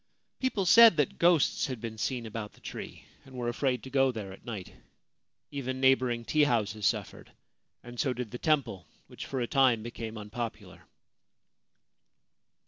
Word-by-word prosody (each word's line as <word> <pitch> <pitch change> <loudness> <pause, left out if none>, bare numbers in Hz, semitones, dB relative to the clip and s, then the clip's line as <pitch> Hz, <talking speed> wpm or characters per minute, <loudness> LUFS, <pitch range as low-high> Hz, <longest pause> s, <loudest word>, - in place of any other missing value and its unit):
People 235 -7 0
said 225 0 +8
that 145 -3 0
ghosts 170 -2 +3
had 130 -4 -5
been 110 -1 -7
seen 125 -1 -2
about 110 -1 -6
the - - -21
tree, - - -8 0.2
and 130 - -15
were 120 -1 -2
afraid 125 0 -1
to 130 - -9
go 135 -1 +3
there 105 -5 -7
at - - -15
night. 105 -6 -7 0.8
Even 130 -2 -4
neighbouring 130 -3 +2
tea 150 +3 +3
houses 110 -5 0
suffered, - - -3 0.5
and 120 0 -10
so 135 - +1
did 125 -3 -5
the 125 - -6
temple, 130 - 0 0.2
which - - -9
for 135 -2 -3
a - - +1
time 125 -3 +3
became 115 -1 -6
unpopular. 110 +2 -7
125 Hz, 160 wpm, -29 LUFS, 115-135 Hz, 0.8 s, said